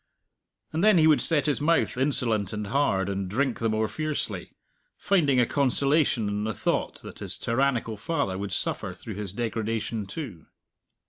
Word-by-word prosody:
And 160 +3 0
then 215 -3 +6
he 155 - +5
would 155 -2 +5
set 160 -4 +4
his 145 -2 0
mouth 165 +3 +2
insolent 120 -7 +1
and 105 0 -3
hard, 100 -6 +1
and 100 -1 -3
drink 130 +5 -1
the 115 - 0
more 110 0 0
fiercely, 155 +4 -3 0.5
finding 150 -10 +2
a 120 - +4
consolation 140 -3 +2
in 105 0 -2
the 110 -1 -3
thought - - -2
that - - -10
his - - -3
tyrannical 120 -2 0
father 140 - -2
would 100 +1 -5
suffer - - -2
through 110 - -8
his 100 -1 -4
degradation 110 -1 -3
too. 100 - -7
115 Hz, 170 wpm, -26 LUFS, 105-145 Hz, 0.5 s, then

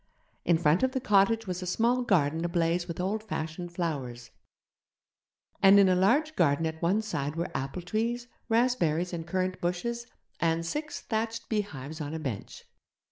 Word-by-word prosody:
In 170 -1 +4
front 160 +1 +3
of 260 0 +1
the 260 - 0
cottage 225 0 +3
was 180 -1 -4
a 180 - -5
small 235 +7 +2
garden 165 -8 +2
ablaze 170 0 0
with 170 - -6
old 200 +4 -1
fashioned 175 -4 -5
flowers; 135 -9 -4 1.3
and 195 +1 +8
in 195 - +6
a 185 - +4
large 280 +12 +3
garden 150 -1 +2
at 160 0 -4
one 190 +6 +2
side 145 -8 -3
were 170 +1 -3
apple 135 +7 -3
trees, 230 +6 -1 0.2
raspberry 225 -9 +2
and 165 -1 -4
currant 185 +1 -1
bushes, 235 +8 -2 0.3
and 165 0 +1
six 300 - -4
thatched 225 0 -3
beehives 160 - -3
on 150 +1 -4
a - - -3
bench. 130 -10 -6
180 Hz, 165 wpm, -29 LUFS, 160-220 Hz, 1.3 s, and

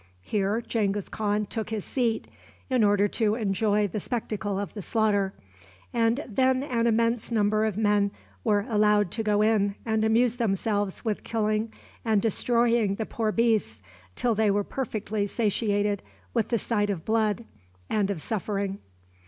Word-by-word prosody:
Here 205 - 0
Genghis 205 -3 -1
Khan 210 0 -1
took 220 +1 -4
his 220 -3 -3
seat 235 -4 -1 0.4
in 250 -3 +3
order 205 0 +4
to 215 -1 +1
enjoy 210 -1 +1
the 205 +3 -4
spectacle 210 -3 -3
of 200 0 -4
the 210 - -6
slaughter, 205 -2 +1 0.6
and 235 +4 +2
then 260 +3 +2
an 235 -4 0
immense 230 0 +1
number 215 -1 +2
of 215 -3 -2
men 205 -2 +3 0.3
were 205 -2 +2
allowed 210 -4 +3
to 225 - -2
go 210 -1 +2
in 205 -2 +2
and 220 -1 +1
amuse 230 +2 +3
themselves 205 -2 -1
with 215 -2 -1
killing 215 0 0 0.3
and 220 -3 +3
destroying 230 -1 +2
the 220 - -3
poor 220 -1 -1
beasts 215 - +1 0.3
till 240 - +1
they 215 0 +2
were 205 +1 +2
perfectly 215 -4 -3
satiated 205 -2 0 0.3
with 230 -3 +1
the 235 - +1
sight 205 -2 0
of 185 -6 -3
blood 220 0 +1 0.4
and 205 -2 +1
of 185 -7 -2
suffering. 200 -2 -2
215 Hz, 155 wpm, -27 LUFS, 205-230 Hz, 0.6 s, order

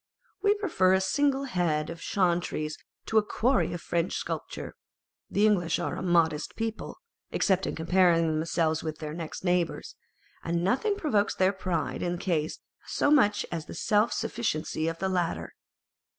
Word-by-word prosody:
We 405 +1 +4
prefer 315 - +2
a - - +3
single 275 +8 +1
head 170 - 0
of 165 - -9
Chantry's 170 -5 0 0.3
to 220 - +4
a - - -1
quarry 245 +5 +1
of 175 - -5
French 170 0 -1
sculpture. - - -5 0.6
The 205 - +2
English 180 -6 +2
are - - -2
a - - -5
modest 170 -4 +1
people, 225 -1 -4 0.3
except 190 -2 +1
in - - -3
comparing 170 0 +3
themselves 160 0 0
with 155 -1 -4
their 155 -1 -6
next 165 +1 -6
neighbours, 180 -2 0 0.5
and 170 0 -1
nothing 270 - +1
provokes 225 - +1
their 190 +1 +3
pride 185 -4 -2
in 175 - -1
this 175 - -7
case 160 -4 0 0.3
so 290 - +1
much 210 -9 +4
as 165 -2 -4
the - - -8
self 210 +2 +2
sufficiency 160 -7 -2
of 165 0 -2
the 190 - -1
latter. 180 -3 -1
180 Hz, 165 wpm, -28 LUFS, 165-210 Hz, 0.6 s, We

